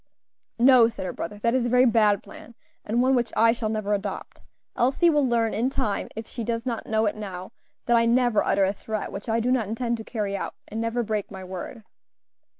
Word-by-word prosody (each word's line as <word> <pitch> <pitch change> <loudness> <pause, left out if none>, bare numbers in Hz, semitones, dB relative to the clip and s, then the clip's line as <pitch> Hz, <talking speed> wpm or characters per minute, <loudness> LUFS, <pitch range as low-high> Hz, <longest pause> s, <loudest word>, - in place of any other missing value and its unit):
"No," 245 -1 +6
said 225 -4 -6
her 180 - -4
brother, 205 +5 -6
"that 230 - +2
is 255 -2 +1
a - - -1
very 250 +1 +5
bad 215 -4 +3
plan, 235 - -13 0.3
and 235 +4 +1
one 260 +1 +3
which 240 -3 +1
I 230 +1 +6
shall 225 -2 -2
never 215 -1 -1
adopt. 200 -1 -5 0.3
Elsie 270 +8 +3
will 295 -2 +2
learn 230 -2 +1
in 235 +4 0
time, 210 -6 -2
if 225 +1 -6
she 235 - -6
does 230 +1 -3
not 235 -3 -3
know 220 0 +1
it 205 - 0
now, 190 -3 -7 0.3
that 240 - +3
I 230 0 +3
never 240 -2 +3
utter 195 - +2
a 190 +1 +1
threat 215 +1 -5
which 200 +4 -7
I 225 +1 +2
do 245 +2 0
not 245 -5 +1
intend 235 +2 -2
to 220 - -7
carry 210 -3 -3
out, - - -5
and 220 +2 -4
never 230 +1 -1
break 215 -2 -3
my 190 -2 -9
word." 190 +5 -7
225 Hz, 230 wpm, -25 LUFS, 210-240 Hz, 0.3 s, No